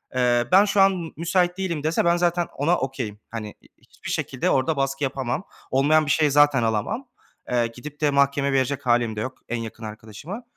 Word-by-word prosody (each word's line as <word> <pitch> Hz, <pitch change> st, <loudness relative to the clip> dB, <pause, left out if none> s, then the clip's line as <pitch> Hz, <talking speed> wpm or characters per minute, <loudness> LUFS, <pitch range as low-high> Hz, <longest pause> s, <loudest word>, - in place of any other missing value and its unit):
eee, 120 Hz, -1 st, +2 dB
ben 195 Hz, +2 st, +7 dB
şu 200 Hz, -1 st, +2 dB
an 195 Hz, -, +6 dB
m 165 Hz, -2 st, -6 dB
müsait 175 Hz, +1 st, +1 dB
değilim," 170 Hz, -6 st, -3 dB
dese 160 Hz, +2 st, +1 dB
ben 170 Hz, 0 st, +3 dB
zaten 175 Hz, 0 st, +1 dB
ona 165 Hz, +6 st, +2 dB
okay'im. 130 Hz, -6 st, -4 dB
Hani, 110 Hz, -2 st, -6 dB, 0.2 s
hiçbir -, -, -12 dB
şekilde -, -, -1 dB
orada 140 Hz, +3 st, +1 dB
baskı 135 Hz, +1 st, -1 dB
yapamam. 135 Hz, +4 st, -2 dB, 0.3 s
Olmayan 150 Hz, +4 st, +3 dB
bir 145 Hz, -, 0 dB
şeyi 150 Hz, -3 st, +3 dB
zaten 145 Hz, -3 st, +4 dB
alamam. 110 Hz, -, -1 dB, 0.4 s
Eee, 120 Hz, -1 st, +1 dB
gidip 140 Hz, +6 st, -11 dB
de 150 Hz, -1 st, +3 dB
mahkemeye 140 Hz, 0 st, +2 dB
verecek 135 Hz, +1 st, 0 dB
hâlim 120 Hz, -2 st, +2 dB
de 105 Hz, -, -3 dB
yok, 130 Hz, +2 st, -5 dB
en 120 Hz, -, -1 dB
yakın, 115 Hz, 0 st, -7 dB
arkadaşımı, 110 Hz, -, -8 dB
140 Hz, 195 wpm, -24 LUFS, 120-165 Hz, 0.4 s, ben